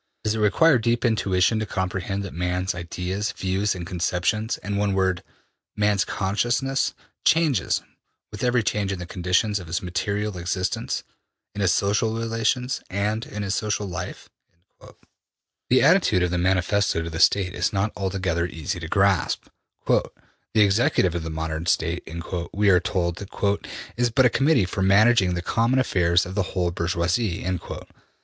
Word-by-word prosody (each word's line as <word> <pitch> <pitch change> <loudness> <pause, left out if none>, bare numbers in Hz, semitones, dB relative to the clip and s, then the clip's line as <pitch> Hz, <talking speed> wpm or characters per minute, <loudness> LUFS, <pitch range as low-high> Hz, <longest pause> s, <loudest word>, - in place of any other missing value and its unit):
Does 110 - +1
it 110 - -2
require 125 +7 +4
deep 120 +2 0
intuition 105 -2 +2
to 110 - -3
comprehend 95 +1 -2
that 100 - -7
man's 90 +2 -1
ideas, 90 +4 -3
views 95 +2 -1
and 90 -1 -6
conceptions, 90 +5 -1
in 105 0 -3
one 100 0 +1
word, 95 -1 +1 0.5
man's 105 -1 +2
consciousness, 120 +8 0 0.3
changes 155 - +2 0.5
with 105 - -7
every 125 -2 +2
change 100 -2 -1
in 100 - -3
the 90 - -6
conditions 95 +3 0
of 90 - -10
his 85 +3 -2
material 95 +3 -2
existence, 90 +1 -2 0.5
in 105 - -4
his 95 -2 +3
social 105 +4 +1
relations, 115 +3 -1
and 105 +4 -1
in 105 0 -5
his 100 -1 -1
social 105 0 -1
life?'' 95 - -6 1.4
The 130 - +4
attitude 145 - +4
of 90 - 0
the 90 - 0
Manifesto 95 0 +1
to 85 - -5
the 80 - -4
State 95 -3 +3
is 90 +4 0
not 100 +1 0
altogether 95 -4 -1
easy 90 +3 -4
to 80 - -6
grasp. 95 0 +1 0.4
``The - - +4 0.5
executive 100 -4 +3
of 85 - -2
the 80 - -5
modern 80 +1 -4
State,'' 85 0 0 0.4
we 100 0 +3
are 90 - +5
told, 85 -1 -1
``is 100 +4 -2
but 130 -2 +5
a 125 - +4
Committee 135 -3 +3
for 95 +1 -4
managing 100 -1 +4
the 85 - -3
common 115 +6 +1
affairs 90 -8 +2
of 90 - -7
the 100 - +1 0.2
whole 90 -1 +1
bourgeoisie.'' 85 +3 -1
100 Hz, 155 wpm, -24 LUFS, 90-110 Hz, 1.4 s, are